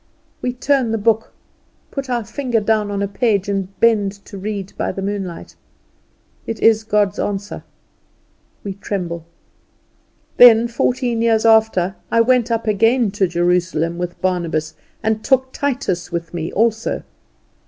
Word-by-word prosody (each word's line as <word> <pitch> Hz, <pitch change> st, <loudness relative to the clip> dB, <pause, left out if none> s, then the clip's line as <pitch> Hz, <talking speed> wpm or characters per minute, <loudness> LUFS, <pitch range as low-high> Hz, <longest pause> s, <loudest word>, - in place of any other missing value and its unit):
We 250 Hz, -, -1 dB
turn 265 Hz, -1 st, +1 dB
the 225 Hz, -, 0 dB
book, 225 Hz, +1 st, +1 dB, 0.6 s
put 275 Hz, -2 st, -5 dB
our 240 Hz, -2 st, -1 dB
finger 245 Hz, -1 st, -1 dB
down 215 Hz, -1 st, +1 dB
on 200 Hz, 0 st, -2 dB
a -, -, 0 dB
page, 200 Hz, -1 st, 0 dB
and 195 Hz, -1 st, -3 dB
bend 210 Hz, -4 st, +3 dB
to -, -, -11 dB
read 200 Hz, 0 st, -5 dB
by -, -, -2 dB
the 195 Hz, -, -5 dB
moonlight. 195 Hz, -, -5 dB, 0.9 s
It 225 Hz, -, -4 dB
is 220 Hz, -1 st, +4 dB
God's 205 Hz, -2 st, +1 dB
answer. 200 Hz, 0 st, -3 dB, 1.0 s
We 200 Hz, -, -4 dB
tremble. 180 Hz, -4 st, -4 dB, 1.1 s
"Then 235 Hz, -1 st, +8 dB
fourteen 240 Hz, 0 st, 0 dB
years 230 Hz, -1 st, +2 dB
after 220 Hz, -4 st, +3 dB
I 230 Hz, -, +2 dB
went 250 Hz, 0 st, +2 dB
up 230 Hz, -1 st, -1 dB
again 225 Hz, +1 st, +2 dB
to 195 Hz, -1 st, +1 dB
Jerusalem 175 Hz, -1 st, 0 dB
with 175 Hz, -1 st, -4 dB
Barnabas, 165 Hz, -4 st, -1 dB, 0.3 s
and 220 Hz, 0 st, 0 dB
took 260 Hz, -1 st, +1 dB
Titus 255 Hz, -11 st, -2 dB
with 170 Hz, 0 st, -4 dB
me 165 Hz, -1 st, -4 dB
also." 225 Hz, +1 st, 0 dB
210 Hz, 145 wpm, -19 LUFS, 190-230 Hz, 1.1 s, Then